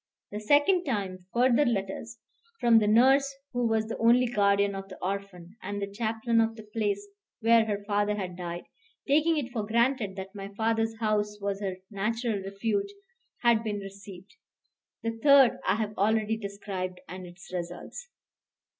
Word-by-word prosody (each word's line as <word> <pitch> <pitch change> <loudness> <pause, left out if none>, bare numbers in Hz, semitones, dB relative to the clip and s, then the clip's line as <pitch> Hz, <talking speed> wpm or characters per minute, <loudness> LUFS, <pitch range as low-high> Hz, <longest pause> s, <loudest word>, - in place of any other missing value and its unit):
The 210 - -4
second 290 - +3
time, 190 - -3
further 245 +3 +4
letters 225 0 -2 0.4
from 235 -1 +6
the 210 - +1
nurse 270 +5 +4 0.2
who 245 -1 +1
was 220 -1 +1
the 220 - -5
only 240 +2 +5
guardian 200 -3 +2
of 195 0 -7
the 185 - -10
orphan, 195 -1 -5
and 205 0 -4
the 200 - -1
chaplain 225 +2 +1
of 225 0 0
the 220 - -10
place 205 -1 -2 0.3
where 230 0 +5
her 205 -2 -3
father 205 0 +1
had 185 -3 -4
died, 175 -1 -5 0.4
taking 310 +3 +3
it 260 -4 -3
for 225 -4 -2
granted 235 -1 +1
that 190 0 -7
my 195 -2 -7
father's 225 0 0
house 210 -2 0
was 200 0 -3
her 190 -2 -2 0.2
natural 215 +1 -1
refuge 225 - -2 0.5
had 235 -2 +4
been 210 -2 -2
received. 195 -1 -10 0.7
The 230 0 -3
third 280 -4 +6
I - - +4
have 215 -1 -2
already 220 +1 +2
described, 200 -3 -5
and 185 +1 -8
its 175 +1 -14
results. 175 - -6
215 Hz, 165 wpm, -28 LUFS, 200-230 Hz, 0.7 s, from